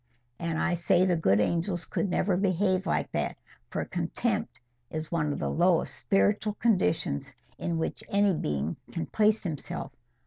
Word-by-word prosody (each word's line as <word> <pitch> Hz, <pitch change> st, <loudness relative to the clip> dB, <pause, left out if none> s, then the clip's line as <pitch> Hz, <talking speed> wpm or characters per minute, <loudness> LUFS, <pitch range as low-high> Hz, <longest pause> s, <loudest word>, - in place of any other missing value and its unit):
"And 165 Hz, -1 st, -2 dB
I 175 Hz, -, +1 dB
say 175 Hz, +1 st, +3 dB
the 180 Hz, -2 st, +3 dB
good 105 Hz, -, +3 dB
angels 170 Hz, -, 0 dB
could 200 Hz, -, -1 dB
never 180 Hz, +1 st, +1 dB
behave 185 Hz, 0 st, +1 dB
like -, -, 0 dB
that, -, -, -1 dB, 0.3 s
for -, -, -2 dB
contempt -, -, -2 dB, 0.3 s
is 155 Hz, 0 st, -5 dB
one 150 Hz, -3 st, +1 dB
of -, -, -2 dB
the -, -, -1 dB
lowest 175 Hz, 0 st, +2 dB
spiritual 205 Hz, +1 st, +1 dB
conditions 180 Hz, -, +1 dB, 0.2 s
in 170 Hz, -1 st, -1 dB
which 160 Hz, -, -3 dB
any 200 Hz, -1 st, +3 dB
being 75 Hz, -, -2 dB
can 165 Hz, -, -3 dB
place 215 Hz, 0 st, +2 dB
himself. 160 Hz, -7 st, -4 dB
175 Hz, 160 wpm, -28 LUFS, 160-195 Hz, 0.3 s, say